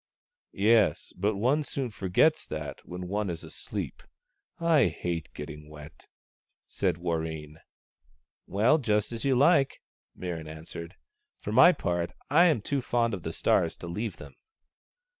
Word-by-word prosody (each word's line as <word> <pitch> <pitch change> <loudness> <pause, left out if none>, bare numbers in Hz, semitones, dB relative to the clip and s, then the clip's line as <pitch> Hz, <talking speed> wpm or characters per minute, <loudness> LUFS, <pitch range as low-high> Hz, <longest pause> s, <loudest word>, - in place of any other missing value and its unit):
" - - -74
Yes, 110 0 +3
but 100 +3 0
one 125 +9 +2
soon 135 -4 -4
forgets 105 - +2
that 75 -2 -5
when 90 0 -6
one 100 +1 -1
is 85 -1 -5
asleep. 80 - -6 0.6
I 165 -5 +4
hate 85 0 -3
getting 75 +1 -8
wet," 75 0 -12 0.6
said 90 -4 -1
Warreen. 80 -3 -3 0.5
" 65 +1 -40
Well, 115 - +3
just 105 -4 +1
as 115 -1 -4
you 135 -1 +3
like," 140 +1 +3 0.3
Mirran 85 -3 -5
answered. 80 +2 -8 0.2
" 420 0 -55
For - - -4
my 175 - +8
part, 85 - -2 0.2
I 170 +4 +7
am 155 -11 +3
too 140 +5 -1
fond 120 -2 +1
of 95 - -3
the - - -4
stars - - +1
to - - -8
leave 105 +6 -4
them." - - -11
100 Hz, 155 wpm, -28 LUFS, 80-125 Hz, 0.6 s, my